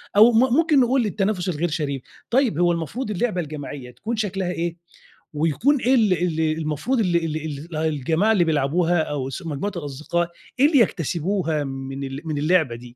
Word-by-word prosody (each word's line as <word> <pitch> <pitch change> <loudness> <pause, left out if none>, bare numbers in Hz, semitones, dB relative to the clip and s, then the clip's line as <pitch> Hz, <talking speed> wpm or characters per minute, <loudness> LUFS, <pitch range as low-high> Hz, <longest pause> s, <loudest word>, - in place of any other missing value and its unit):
أو 220 +4 +8
م 240 +2 +3
ممكن 315 -1 +4
نقول 255 -1 +3
التنافس 195 -2 -1
الغير 170 +1 -1
شريف. 145 -4 -2 0.3
طيب، 240 - +2
هو 175 0 +4
المفروض 170 - -3
اللعبة 210 -2 0
الجماعية 145 -4 -7
تكون 215 - -4
شكلها 195 -4 -2
إيه؟ 170 -1 -2 0.6
ويكون 165 - +2
إيه 255 +3 +3
ال 220 -6 +4
ال 170 -2 0 0.2
المفروض 155 - -1
ال 180 -5 +2
ال 165 -2 -1 0.4
ال - - -4
الجماعة 160 +6 +1
اللي 190 -5 +3
بيلعبوها 165 +3 +1
أو 140 -4 -3
س 160 - -6
مجموعة 160 +7 -3
الأصدقاء، 155 +3 -2 0.3
إيه 280 - +7
اللي 295 -3 +4
يكتسبوها 170 -4 0
من 135 0 -5
ال 135 +1 -5
من 155 -2 -2
اللعبة 155 -4 +2
دي؟ 120 - -14
170 Hz, 175 wpm, -23 LUFS, 150-210 Hz, 0.6 s, أو